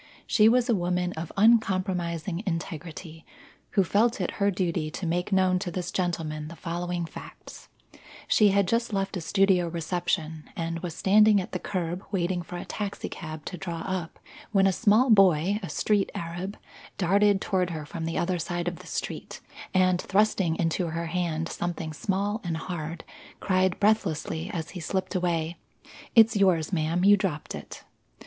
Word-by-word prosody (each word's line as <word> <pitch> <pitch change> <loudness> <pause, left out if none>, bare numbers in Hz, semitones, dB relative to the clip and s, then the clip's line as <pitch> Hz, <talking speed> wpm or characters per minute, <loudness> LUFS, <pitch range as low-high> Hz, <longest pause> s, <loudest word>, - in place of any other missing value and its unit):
She 215 0 +5
was 245 +1 +3
a 235 - +3
woman 180 -2 0
of 160 0 -6
uncompromising 185 -5 +2
integrity, 165 -1 -5 0.5
who 195 - +4
felt 225 +6 +2
it - - -1
her 200 - +4
duty 175 -5 -1
to 175 - -5
make 175 +3 -1
known 185 -1 +3
to 180 - -3
this 180 +1 -4
gentleman 160 -4 -2
the 170 - -9
following 175 0 -3
facts: - - -11 0.6
She 210 - +5
had 200 -1 +3
just 230 +2 0
left 195 0 -1
a 180 - -3
studio 190 0 +3
reception, 165 -2 -2
and 165 0 -3
was 170 -2 -5
standing 210 +1 +5
at 185 - -5
the 185 - -3
curb 180 -1 -3
waiting 180 -2 0
for 175 +1 -7
a - - -6
taxicab 160 -6 -5
to 180 - -6
draw 170 -3 -4
up, 185 -2 -4 0.3
when 195 -2 +4
a 195 - +5
small 230 +5 +4
boy 195 -1 +5
a 180 - -6
street 200 +7 +1
arab 175 +4 -5 0.4
darted 200 +2 +3
toward 185 -2 0
her 155 -3 -5
from 165 +2 -5
the 165 - -2
other 180 0 0
side 175 +1 -3
of 175 -1 -2
the - - -13
street, - - -5 0.3
and 185 -1 +3
thrusting 195 -4 +2
into 165 +2 0
her 165 +1 -3
hand 165 -1 -1
something 170 -3 -4
small 200 +6 -1
and 170 -3 -2
hard, 165 -1 -5 0.4
cried 185 -1 +1
breathlessly 170 -6 +1
as 160 -2 -4
he 180 - -7
slipped 190 +4 -2
away, 170 -2 -1 0.6
"It's 225 -1 +7
yours, 185 -4 +2
ma'am; 170 +2 +1
you 205 0 +7
dropped 180 -7 -3
it." - - -9
180 Hz, 170 wpm, -27 LUFS, 165-195 Hz, 0.6 s, It's